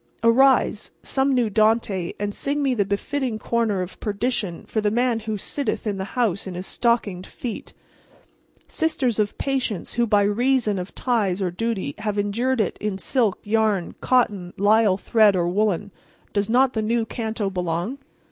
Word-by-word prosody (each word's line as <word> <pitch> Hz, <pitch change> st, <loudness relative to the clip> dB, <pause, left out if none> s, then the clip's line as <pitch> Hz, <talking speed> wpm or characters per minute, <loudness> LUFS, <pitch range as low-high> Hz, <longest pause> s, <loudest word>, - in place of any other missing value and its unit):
Arise, 240 Hz, -2 st, +4 dB
some 270 Hz, +1 st, +1 dB
new 250 Hz, -3 st, +2 dB
Dante, 215 Hz, -4 st, +1 dB
and 205 Hz, 0 st, -2 dB
sing 285 Hz, +5 st, -1 dB
me 270 Hz, -2 st, +2 dB
the 215 Hz, -4 st, +2 dB
befitting 230 Hz, +5 st, -2 dB
corner 215 Hz, -4 st, 0 dB
of 180 Hz, -, -10 dB
perdition 210 Hz, -4 st, -2 dB
for 220 Hz, -, -1 dB
the 210 Hz, -, +2 dB
man 240 Hz, +1 st, +1 dB
who 215 Hz, -1 st, -3 dB
sitteth 245 Hz, +4 st, -3 dB
in 205 Hz, -2 st, -1 dB
the 190 Hz, +1 st, -6 dB
house 200 Hz, -6 st, 0 dB
in 185 Hz, -, -6 dB
his 180 Hz, +1 st, -5 dB
stockinged 210 Hz, -7 st, 0 dB
feet. 235 Hz, -4 st, -7 dB, 0.9 s
Sisters 265 Hz, -8 st, 0 dB
of 210 Hz, -1 st, 0 dB
Patience 260 Hz, -8 st, -2 dB
who 235 Hz, 0 st, +1 dB
by 205 Hz, -2 st, +4 dB
reason 220 Hz, 0 st, +1 dB
of 180 Hz, +2 st, -7 dB
ties 210 Hz, -7 st, 0 dB
or 185 Hz, -3 st, -1 dB
duty 195 Hz, -5 st, -2 dB
have 210 Hz, -1 st, -2 dB
endured 230 Hz, +6 st, 0 dB
it 215 Hz, -, -1 dB
in 210 Hz, -2 st, -2 dB
silk, 220 Hz, 0 st, 0 dB
yarn, 210 Hz, -4 st, +1 dB
cotton, 205 Hz, -8 st, +1 dB
lisle 205 Hz, -1 st, +4 dB
thread 215 Hz, -1 st, +4 dB
or 175 Hz, -1 st, +1 dB
woollen—does 200 Hz, +1 st, -2 dB
not 255 Hz, +2 st, +4 dB
the 220 Hz, -, -1 dB
new 225 Hz, +1 st, 0 dB
canto 220 Hz, -3 st, -3 dB
belong? 180 Hz, +7 st, -2 dB
215 Hz, 165 wpm, -23 LUFS, 200-240 Hz, 0.9 s, Arise